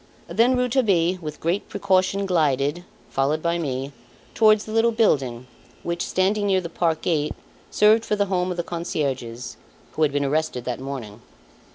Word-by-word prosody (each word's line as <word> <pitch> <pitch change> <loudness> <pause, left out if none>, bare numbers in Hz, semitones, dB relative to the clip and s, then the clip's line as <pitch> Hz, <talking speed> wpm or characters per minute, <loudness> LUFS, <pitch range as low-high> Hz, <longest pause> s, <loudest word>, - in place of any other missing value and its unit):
Then 230 +9 +3
Rouletabille, 210 -9 +2
with 155 -2 -6
great 170 +5 -1
precaution 195 0 +1
glided, 150 -2 +1 0.3
followed 145 +3 0
by 170 0 0
me, 135 -3 -3 0.4
towards 215 -1 +4
the 215 - -8
little 225 +1 +3
building 135 - +1 0.4
which, 170 0 -2
standing 205 +2 +1
near 190 -1 +3
the 170 -2 -6
park 165 -2 -1
gate, 155 -3 0 0.3
served 215 +2 +4
for 210 - 0
the 205 -1 +1
home 185 -2 -1
of 180 - -4
the 175 - -1
concierges, 135 -9 -4 0.3
who - - -5
had 150 -2 +4
been 140 0 0
arrested 145 -4 -1
that 125 0 -3
morning. 125 -6 -7
170 Hz, 165 wpm, -23 LUFS, 140-200 Hz, 0.4 s, towards